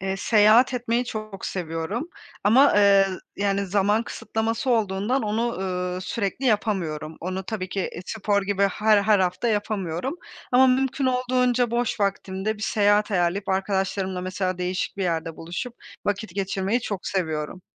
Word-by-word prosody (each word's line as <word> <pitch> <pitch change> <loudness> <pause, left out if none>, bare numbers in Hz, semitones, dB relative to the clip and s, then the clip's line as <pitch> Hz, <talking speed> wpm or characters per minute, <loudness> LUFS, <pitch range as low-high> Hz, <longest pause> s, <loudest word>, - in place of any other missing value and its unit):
Eee, 190 +1 -2
seyahat 220 +5 +5
etmeyi 240 0 0
çok 215 -4 -6
seviyorum 175 - -3 0.4
ama, 255 +8 +6
eee, 200 -1 +6 0.3
yani, 200 0 0
zaman 205 +3 +2
kısıtlaması 225 +2 -2
olduğundan 220 +3 +1
onu, 225 +3 0
ııı, 180 -1 -2
sürekli 215 +6 -2
yapamıyorum. 170 -8 -1
Onu 185 +2 -3
tabii 190 -2 -4
ki, 195 - -3
e, 175 - -4
spor 205 -2 0
gibi 200 0 -1
her 210 +1 +3
her 210 0 +4
hafta 185 +5 0
yapamıyorum 205 - -2 0.4
ama 260 +1 +7
mümkün 265 +1 +1
olduğunca 250 -1 +1
boş 240 -2 -1
vaktimde 200 +1 -1
bir 210 - -9
seyahat 205 +1 +2
ayarlayıp 185 +2 0
arkadaşlarımla 190 -1 -1
mesela 185 0 -2
değişik 180 +2 -2
bir 195 - -2
yerde 165 -2 -2
buluşup 175 +9 -5 0.3
vakit 205 -2 -2
geçirmeyi 195 +3 -1
çok 200 -6 -5
seviyorum. 160 -1 -2
200 Hz, 145 wpm, -24 LUFS, 185-225 Hz, 0.4 s, ama